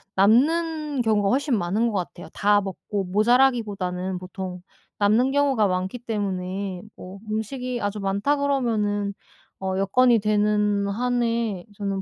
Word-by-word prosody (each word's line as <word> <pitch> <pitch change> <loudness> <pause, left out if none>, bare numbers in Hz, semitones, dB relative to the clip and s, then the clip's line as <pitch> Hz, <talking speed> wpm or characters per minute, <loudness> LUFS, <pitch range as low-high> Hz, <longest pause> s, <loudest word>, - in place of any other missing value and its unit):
남는 300 - +2
경우가 215 -3 +2
훨씬 270 0 +1
많은 205 +6 0
것 - - -4
같아요. 175 - -12
다 205 0 +3
먹고 195 +1 -4
모자라기보다는 205 -4 +1
보통 185 0 -7 0.4
남는 220 +6 +3
경우가 275 -6 +2
많기 185 +5 -2
때문에 195 -4 -3
뭐 185 +2 -10
음식이 245 +3 -3
아주 205 +1 -2
많다 200 +9 0
그러면은 220 -8 0 0.5
어 190 0 -2
여건이 235 +5 +4
되는 210 -1 +1
한에 230 -3 -1
저는 195 -2 -2
210 Hz, 285 characters per minute, -24 LUFS, 195-245 Hz, 0.5 s, 여건이